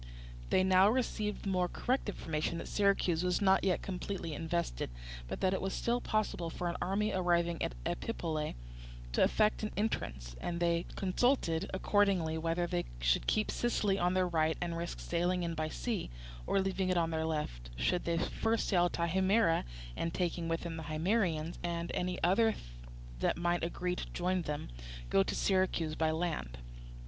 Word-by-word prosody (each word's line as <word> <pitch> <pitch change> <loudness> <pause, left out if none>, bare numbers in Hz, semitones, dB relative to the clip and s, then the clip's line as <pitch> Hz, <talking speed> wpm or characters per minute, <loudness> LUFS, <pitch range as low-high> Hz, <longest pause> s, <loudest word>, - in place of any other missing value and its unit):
They 185 - +4
now 190 +1 +6
received 215 -4 -1
the 200 - -2
more 180 -1 +2
correct 250 +4 -1
information 160 -3 -2
that - - -5
Syracuse 195 -4 +2
was 180 0 +1
not 190 -1 +4
yet 185 -2 +1
completely 180 -3 -4
invested, 165 - -2 0.4
but - - -5
that 190 0 +3
it 190 - -1
was 190 0 -2
still 240 +1 0
possible 210 -6 -1
for 175 +2 -3
an 170 - -2
army 205 +4 +1
arriving 170 -2 +1
at - - -1
Epipolae 155 - -2 0.6
to - - +1
effect 215 0 +3
an 215 - -1
entrance; 65 - -2
and 170 -1 -2
they 170 0 +1
consulted, 190 -4 +1
accordingly, 190 -4 +2
whether 165 +2 0
they 90 - -1
should - - +2
keep 215 0 +2
Sicily 205 -5 +1
on 180 +1 +2
their 185 -1 +3
right 160 -2 +1
and 170 -1 -2
risk 170 +1 -4
sailing 175 +1 0
in 170 -1 -1
by 155 -1 -2
sea, 220 +3 -3 0.4
or, - - +3
leaving 190 -1 0
it 185 - +2
on 165 -1 +2
their 160 0 0
left, 105 - -3
should 170 - 0 0.2
first 225 0 0
sail 175 -3 +4
to 170 - -2
Himera 190 +1 +3 0.3
and, 165 0 -2
taking 175 -2 -1
with 165 0 -1
them 165 -1 -5
the 160 - -5
Himeraeans 165 0 0
and 170 -1 -2
any 180 0 -1
others 220 +5 +4 0.6
that - - +1
might 175 0 0
agree 180 +1 -1
to - - -6
join 180 +1 0
them, 150 - -4 0.4
go 95 - +5
to - - -1
Syracuse 185 -5 +1
by 160 0 +1
land. 160 - -2
175 Hz, 175 wpm, -33 LUFS, 165-190 Hz, 0.6 s, now